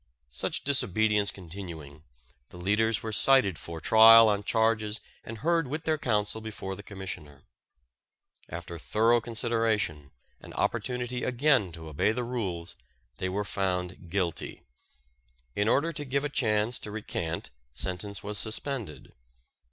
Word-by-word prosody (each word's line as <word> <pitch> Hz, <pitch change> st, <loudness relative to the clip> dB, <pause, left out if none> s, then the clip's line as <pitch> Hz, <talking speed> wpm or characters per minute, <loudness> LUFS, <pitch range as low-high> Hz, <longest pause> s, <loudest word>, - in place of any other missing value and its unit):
Such -, -, -2 dB
disobedience 110 Hz, -6 st, +2 dB
continuing, 85 Hz, -6 st, -8 dB, 0.5 s
the -, -, -12 dB
leaders 105 Hz, +4 st, +1 dB
were 110 Hz, -, -3 dB
cited 105 Hz, -5 st, +4 dB
for 85 Hz, -1 st, -7 dB
trial 110 Hz, +4 st, +8 dB
on 100 Hz, -1 st, +1 dB
charges 110 Hz, 0 st, +1 dB, 0.2 s
and 115 Hz, -, -7 dB
heard 165 Hz, +3 st, +1 dB
with 150 Hz, +4 st, -4 dB
their 155 Hz, -1 st, 0 dB
counsel 105 Hz, -3 st, 0 dB
before 105 Hz, -3 st, -6 dB
the 105 Hz, -, -9 dB
Commissioner. 90 Hz, -9 st, -8 dB, 1.1 s
After 85 Hz, 0 st, -7 dB
thorough 115 Hz, +7 st, +3 dB
consideration, 110 Hz, -, 0 dB, 0.3 s
and -, -, -12 dB
opportunity 125 Hz, 0 st, -1 dB
again 130 Hz, -, +2 dB
to 80 Hz, 0 st, -9 dB
obey 80 Hz, +8 st, +1 dB
the 125 Hz, +1 st, -2 dB
rules, 95 Hz, -9 st, -4 dB, 0.4 s
they 95 Hz, -, -2 dB
were 100 Hz, +2 st, -2 dB
found 90 Hz, -2 st, -2 dB
guilty. 90 Hz, -2 st, -2 dB, 0.9 s
In 105 Hz, +1 st, +1 dB
order 150 Hz, +8 st, +2 dB
to 145 Hz, -, -5 dB
give 140 Hz, 0 st, -1 dB
a 145 Hz, -, -1 dB
chance 110 Hz, -3 st, +1 dB
to -, -, -7 dB
recant 85 Hz, -6 st, -4 dB, 0.2 s
sentence 95 Hz, +5 st, -3 dB
was 105 Hz, -1 st, -1 dB
suspended. 110 Hz, -, -3 dB
105 Hz, 135 wpm, -28 LUFS, 90-115 Hz, 1.1 s, trial